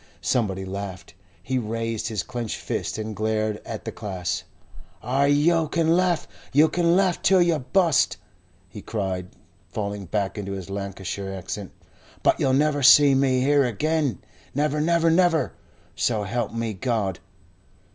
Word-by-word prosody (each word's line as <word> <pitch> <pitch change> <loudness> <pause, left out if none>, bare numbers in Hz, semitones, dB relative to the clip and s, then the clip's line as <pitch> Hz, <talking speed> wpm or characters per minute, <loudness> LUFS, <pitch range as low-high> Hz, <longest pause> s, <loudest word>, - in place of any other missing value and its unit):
Somebody 95 -6 0
laughed. 95 -1 -6 0.3
He 130 -1 -1
raised 115 0 -3
his 105 -6 -2
clenched 120 -1 -4
fists - - -3
and 110 0 -4
glared 110 0 -1
at - - -7
the - - -3
class. 95 -3 -3 0.6
"Ay, 135 +4 +2
yo' 155 +3 +3
can 165 +1 +2
laugh 180 -3 +1 0.2
you 150 +3 +5
can 170 -1 +2
laugh 185 -2 +2
till 190 -1 +4
yo' 170 -3 +3
bust!" 160 +4 +2 0.5
he 95 +3 -10
cried, 95 -5 -3 0.4
falling 100 -1 -4
back 100 +2 -2
into 100 -1 -4
his 95 -1 -7
Lancashire 100 0 -5
accent. 95 +1 -6 0.5
"But - - +3
yo'll 130 - +2
never 145 +1 +2
see 140 +1 +8
me, 135 -1 +2
here 140 +1 +4
agen. 135 - -1 0.3
Never, 150 +1 +1
never, 165 +1 +3
never, 170 -2 +2 0.4
so 110 -4 0
help 120 +4 -2
me 115 -1 -3
God!" 105 -4 -1
120 Hz, 145 wpm, -24 LUFS, 100-150 Hz, 0.6 s, see